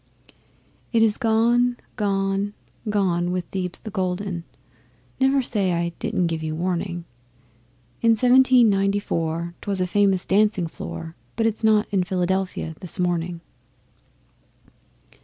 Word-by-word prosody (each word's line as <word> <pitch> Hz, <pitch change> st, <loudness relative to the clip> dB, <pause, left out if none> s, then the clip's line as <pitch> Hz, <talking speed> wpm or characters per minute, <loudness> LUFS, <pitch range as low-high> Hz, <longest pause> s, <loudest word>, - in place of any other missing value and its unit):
It 230 Hz, -2 st, +4 dB
is 215 Hz, -2 st, +2 dB
gone, 240 Hz, +2 st, +3 dB, 0.2 s
gone, 195 Hz, 0 st, 0 dB, 0.3 s
gone 180 Hz, -4 st, +1 dB
with 180 Hz, -1 st, -2 dB
Thebes 180 Hz, -2 st, -3 dB
the 215 Hz, -, -8 dB
Golden 185 Hz, -2 st, -2 dB, 0.7 s
(Never 270 Hz, 0 st, +3 dB
say 200 Hz, -6 st, 0 dB
I 170 Hz, 0 st, 0 dB
didn't 220 Hz, -6 st, 0 dB
give 165 Hz, -1 st, -2 dB
you 155 Hz, 0 st, -3 dB
warning). 175 Hz, 0 st, -2 dB, 1.0 s
In 230 Hz, -1 st, +5 dB
Seventeen 250 Hz, +1 st, +5 dB
Ninety 195 Hz, 0 st, +2 dB
four 170 Hz, -2 st, -2 dB
'twas 200 Hz, -2 st, -2 dB
a 185 Hz, -, +2 dB
famous 195 Hz, 0 st, +2 dB
dancing 205 Hz, -2 st, +2 dB
floor 165 Hz, 0 st, -7 dB, 0.2 s
But 225 Hz, -, 0 dB
it's 225 Hz, 0 st, -1 dB
not 215 Hz, -1 st, +4 dB
in 195 Hz, -3 st, +2 dB
Philadelphia 185 Hz, -2 st, -1 dB
this 180 Hz, -, -4 dB
morning. 175 Hz, -1 st, -1 dB
195 Hz, 125 wpm, -23 LUFS, 175-215 Hz, 1.0 s, In